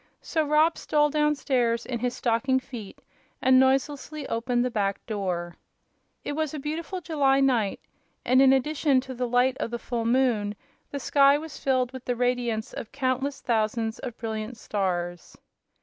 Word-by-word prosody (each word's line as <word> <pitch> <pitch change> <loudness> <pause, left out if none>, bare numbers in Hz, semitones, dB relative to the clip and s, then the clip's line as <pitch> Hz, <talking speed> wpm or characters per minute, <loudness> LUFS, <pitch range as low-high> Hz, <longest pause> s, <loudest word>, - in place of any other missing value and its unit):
So 315 - 0
Rob 305 +2 +3
stole 295 -1 +2
down 300 0 +2
stairs 245 -4 0
in 240 -2 -3
his 245 +1 -1
stocking 255 +2 +1
feet 240 -6 -10 0.4
and 260 0 +5
noiselessly 275 +2 0
opened 240 +1 0
the 250 - -1
back 200 -3 -1
door. 180 -5 -3 0.7
It - - -3
was 310 0 -2
a - - -4
beautiful 325 +6 -4
July 280 -5 +2
night 245 -7 +2 0.5
and, 255 +2 +5
in 270 -1 +7
addition 280 +1 +2
to 260 0 -8
the 250 0 -2
light 250 +2 +2
of - - -2
the 235 - -3
full 235 -1 -3
moon, 230 -4 +1 0.3
the 280 - -4
sky 280 +1 +4
was 315 0 -8
filled 255 -2 +1
with 260 -1 -8
the 245 - -1
radiance 240 -2 -1
of - - -7
countless 270 +1 -1
thousands 225 -1 0
of 245 -3 -6
brilliant 220 +1 -4
stars. 175 -5 -3
255 Hz, 165 wpm, -26 LUFS, 230-275 Hz, 0.7 s, in